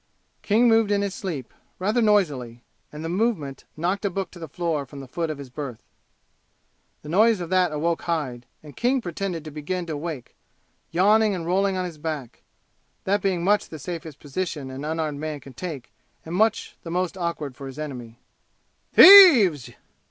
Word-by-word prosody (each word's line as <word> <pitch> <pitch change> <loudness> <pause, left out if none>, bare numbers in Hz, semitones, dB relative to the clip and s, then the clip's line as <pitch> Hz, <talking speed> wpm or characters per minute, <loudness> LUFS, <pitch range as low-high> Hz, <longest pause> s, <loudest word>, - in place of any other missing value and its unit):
King 225 +4 +3
moved 225 -2 +4
in 200 -1 +1
his 200 -2 -3
sleep, 160 - -6 0.2
rather 210 +6 0
noisily, 145 - +1 0.3
and 150 +2 -8
the - - -2
movement 175 - -2
knocked 180 +6 -1
a 200 - +1
book 190 0 -4
to 175 - -13
the 165 - -7
floor 160 -1 -2
from 140 +1 -11
the 135 - -9
foot 165 +5 -3
of 155 - -4
his 140 -3 -10
berth. 130 -4 -7 1.2
The 150 - -9
noise 215 +5 +4
of 175 -1 -6
that 185 -3 +3
awoke 165 +2 -1
Hyde, 135 -8 -3 0.2
and 150 -2 -13
King 255 +3 +1
pretended 175 -4 -5
to 155 - -7
begin 165 +5 -4
to 160 -2 -4
wake, 145 -4 -6 0.5
yawning 210 +4 +3
and 170 -2 -5
rolling 190 +2 +1
on 185 - -2
his 165 -4 -8
back 150 -6 -6 0.6
(that 200 +1 0
being 185 -3 0
much 205 +3 +2
the 160 - -8
safest 160 -1 -7
position 145 -2 -5
an 135 +2 -7
unarmed 155 -2 -3
man 155 -1 -4
can 135 -1 -13
take 150 -6 -7 0.3
and 160 - -7
much 220 +4 0
the 165 - -9
most 180 +1 -2
awkward 170 -7 -4
for 135 +2 -9
his 135 +1 -10
enemy). 125 -6 -7 0.8
"Thieves!" 265 - +9
170 Hz, 180 wpm, -24 LUFS, 145-195 Hz, 1.2 s, Thieves